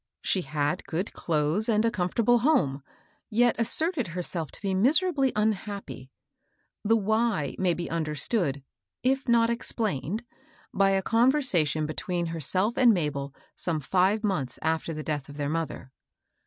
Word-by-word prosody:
She 190 Hz, -, +1 dB
had 145 Hz, -1 st, -2 dB
good 175 Hz, +5 st, -3 dB
clothes 160 Hz, +7 st, +1 dB
and 215 Hz, 0 st, +2 dB
a 230 Hz, -, +2 dB
comfortable 230 Hz, +5 st, +1 dB
home, 180 Hz, -, +1 dB, 0.5 s
yet 240 Hz, +2 st, +3 dB
asserted 275 Hz, -, +2 dB
herself 170 Hz, -2 st, -2 dB
to -, -, -8 dB
be 195 Hz, -1 st, -1 dB
miserably 275 Hz, -, +3 dB
unhappy. 200 Hz, -, -3 dB, 0.7 s
The 225 Hz, +2 st, +3 dB
wJiy 215 Hz, -, 0 dB
may 180 Hz, -3 st, +2 dB
be 175 Hz, -, -4 dB
understood, 155 Hz, -, -1 dB, 0.4 s
if 265 Hz, +2 st, 0 dB
not 230 Hz, 0 st, +4 dB
explained, 220 Hz, -, -2 dB, 0.5 s
by 195 Hz, 0 st, +3 dB
a 195 Hz, 0 st, +1 dB
conversation 225 Hz, -, +2 dB
between 175 Hz, +3 st, -3 dB
herself 185 Hz, -, 0 dB
and 245 Hz, -3 st, +7 dB
Mabel 140 Hz, -4 st, -3 dB, 0.2 s
some 165 Hz, -3 st, -1 dB
five 190 Hz, -, +1 dB
months 150 Hz, -, -2 dB
after 160 Hz, +1 st, -1 dB
the 155 Hz, -1 st, -5 dB
death 145 Hz, -3 st, -3 dB
of 145 Hz, -, -10 dB
their 145 Hz, -1 st, -2 dB
mother. 160 Hz, -5 st, -4 dB
190 Hz, 140 wpm, -27 LUFS, 155-230 Hz, 0.7 s, and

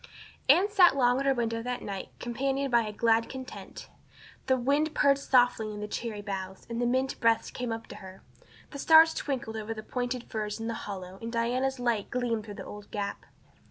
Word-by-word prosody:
Anne 350 Hz, +8 st, +6 dB
sat 375 Hz, -8 st, +5 dB
long 250 Hz, -1 st, +3 dB
at 275 Hz, -, -1 dB
her 270 Hz, -, +5 dB
window 230 Hz, -1 st, -1 dB
that 245 Hz, +1 st, -4 dB
night 195 Hz, -2 st, -5 dB
companioned 270 Hz, +3 st, -2 dB
by 235 Hz, -1 st, +5 dB
a 215 Hz, -2 st, -4 dB
glad 225 Hz, +1 st, +2 dB
content. 260 Hz, -1 st, -8 dB, 0.6 s
The 260 Hz, -, +3 dB
wind 285 Hz, +5 st, +1 dB
purred 280 Hz, -1 st, +4 dB
softly 245 Hz, -5 st, +3 dB
in 210 Hz, -, -7 dB
the 210 Hz, -, -4 dB
cherry 210 Hz, -1 st, -4 dB
boughs, 190 Hz, -1 st, -5 dB
and 235 Hz, +1 st, -2 dB
the 240 Hz, -, +2 dB
mint 260 Hz, +2 st, 0 dB
breaths 230 Hz, -1 st, +2 dB
came 245 Hz, -2 st, -4 dB
up 225 Hz, 0 st, -4 dB
to -, -, -9 dB
her. 190 Hz, -1 st, -12 dB, 0.5 s
The 280 Hz, -, -7 dB
stars 320 Hz, +2 st, +7 dB
twinkled 240 Hz, -6 st, -3 dB
over 220 Hz, +1 st, -4 dB
the 215 Hz, -, -7 dB
pointed 245 Hz, +1 st, -3 dB
firs 215 Hz, -1 st, -4 dB
in 225 Hz, -, -4 dB
the 230 Hz, -, -2 dB, 0.2 s
hollow 190 Hz, -1 st, -7 dB
and 230 Hz, 0 st, -5 dB
Diana's 250 Hz, +3 st, 0 dB
light 235 Hz, -4 st, 0 dB
gleamed 235 Hz, -4 st, -1 dB
through 205 Hz, -2 st, -8 dB
the -, -, -8 dB
old 205 Hz, 0 st, -10 dB
gap. 200 Hz, -1 st, -4 dB
235 Hz, 205 wpm, -29 LUFS, 215-265 Hz, 0.6 s, stars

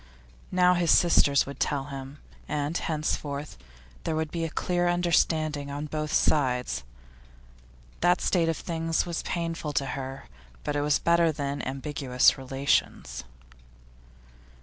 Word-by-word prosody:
Now 180 Hz, 0 st, +5 dB
his 175 Hz, -2 st, +1 dB
sisters 145 Hz, -5 st, +5 dB
would 140 Hz, -, -8 dB
tell 145 Hz, -2 st, 0 dB
him, 135 Hz, 0 st, -8 dB, 0.3 s
and 150 Hz, +2 st, -2 dB
henceforth 150 Hz, -3 st, -2 dB, 0.5 s
there 160 Hz, -, -1 dB
would 155 Hz, -1 st, -2 dB
be 170 Hz, -1 st, -2 dB
a 165 Hz, -, -1 dB
clear 175 Hz, +2 st, 0 dB
understanding 160 Hz, -4 st, +1 dB
on 145 Hz, +1 st, -4 dB
both 155 Hz, 0 st, -3 dB
sides. 125 Hz, -, +1 dB, 1.2 s
That 175 Hz, 0 st, +3 dB
state 170 Hz, -3 st, +2 dB
of 165 Hz, -, -1 dB
things 165 Hz, -1 st, -1 dB
was 170 Hz, -2 st, -3 dB
painful 165 Hz, -3 st, -3 dB
to 140 Hz, -, +1 dB
her, 135 Hz, 0 st, -6 dB, 0.4 s
but 145 Hz, -, -2 dB
it 145 Hz, -, +1 dB
was 145 Hz, 0 st, +3 dB
better 170 Hz, -1 st, +3 dB
than 140 Hz, -2 st, -3 dB
ambiguous 135 Hz, -1 st, +2 dB
relations. 130 Hz, -, -1 dB
150 Hz, 130 wpm, -27 LUFS, 140-165 Hz, 1.2 s, Now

